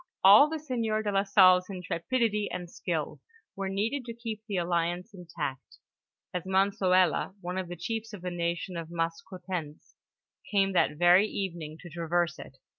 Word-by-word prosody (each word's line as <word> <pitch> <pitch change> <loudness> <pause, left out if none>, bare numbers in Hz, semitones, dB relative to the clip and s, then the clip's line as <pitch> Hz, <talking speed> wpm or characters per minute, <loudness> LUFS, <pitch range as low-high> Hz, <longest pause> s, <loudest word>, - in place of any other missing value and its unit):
All 205 +10 +9
the'sieur 245 -9 -2
de 205 - -1
la 195 0 +3
Salle's 185 -2 +5
intrepidity 205 +4 -1
and 180 - -5
skill - - -3 0.3
were 195 0 -3
needed 220 +8 -1
to 230 -1 -7
keep 225 -2 -6
the 200 -3 -2
alliance 175 +3 -1
intact, 160 -7 -6 0.6
as 180 - -1
Monsoela, 190 -2 +2
one 180 0 -4
of 185 - -4
the 175 - -6
chiefs 225 +5 -4
of 200 -4 -9
the 180 - -3
nation 170 +1 -3
of 165 -1 -6
Maskoutens 170 -1 -5 0.6
came 195 -2 +2
that 150 -4 +2
very 175 +4 +6
evening 170 -7 -5
to 175 - -10
traverse 170 -1 -1
it. 135 - -11
185 Hz, 155 wpm, -29 LUFS, 170-205 Hz, 0.6 s, All